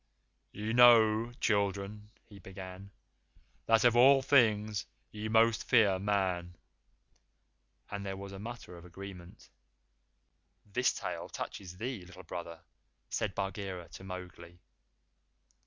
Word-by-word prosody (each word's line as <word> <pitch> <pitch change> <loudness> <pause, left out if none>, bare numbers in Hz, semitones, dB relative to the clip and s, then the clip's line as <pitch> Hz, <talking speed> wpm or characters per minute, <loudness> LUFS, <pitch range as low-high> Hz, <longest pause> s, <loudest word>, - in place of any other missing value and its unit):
"Ye 105 +2 -4
know, 115 -1 +6
children," 100 0 -1 0.2
he 100 -3 -14
began, 95 +1 -10 0.8
"that 115 +1 +4
of 120 -1 +5
all 135 +2 +6
things 110 - +3 0.2
ye 105 0 -5
most 115 0 +3
fear 105 -6 +4
Man;" 95 -3 -1 1.4
and 100 0 -4
there 95 -1 -4
was 100 0 -8
a 95 - -8
mutter 115 -3 -8
of 85 - -12
agreement. 90 0 -11 1.2
"This 110 +5 +1
tale - - -5
touches 90 -2 -7
thee, 115 -2 -4
Little 95 +1 -13
Brother," 85 -1 -7 0.5
said 100 -4 -2
Bagheera 95 -3 -4
to - - -11
Mowgli. 90 -2 -9
100 Hz, 115 wpm, -32 LUFS, 95-110 Hz, 1.4 s, know